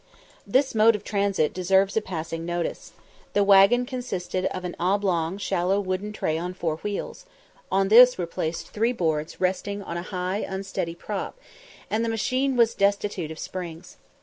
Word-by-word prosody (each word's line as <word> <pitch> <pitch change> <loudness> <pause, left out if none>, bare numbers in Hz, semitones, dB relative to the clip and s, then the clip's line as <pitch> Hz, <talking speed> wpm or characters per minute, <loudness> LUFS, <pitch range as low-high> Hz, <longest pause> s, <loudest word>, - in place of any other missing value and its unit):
This 265 +6 +2
mode 225 +1 +5
of 210 - -6
transit 200 -7 0
deserves 190 +2 +2
a 220 - +2
passing 165 -4 -5
notice. 175 0 -4 0.4
The 205 - +3
waggon 200 +5 +6
consisted 195 -8 -3
of 185 -1 -3
an 175 - -5
oblong 180 -2 0
shallow 190 -1 0
wooden 190 +1 -3
tray 160 -6 -1
on 180 +2 -4
four 160 -4 -2
wheels; 205 - -5 0.4
on 195 0 +2
this 245 +3 +8
were 180 - -1
placed 165 0 -4
three 230 +3 0
boards 160 -7 -2
resting 200 +2 -1
on 170 - -5
high 180 +2 -3
unsteady 190 -4 -4
props, 205 - -5 0.5
and 220 +2 0
the 230 - 0
machine 255 +4 0
was 230 -1 +4
destitute 200 -4 0
of 160 - -8
springs. 175 0 -7
195 Hz, 160 wpm, -25 LUFS, 175-210 Hz, 0.5 s, this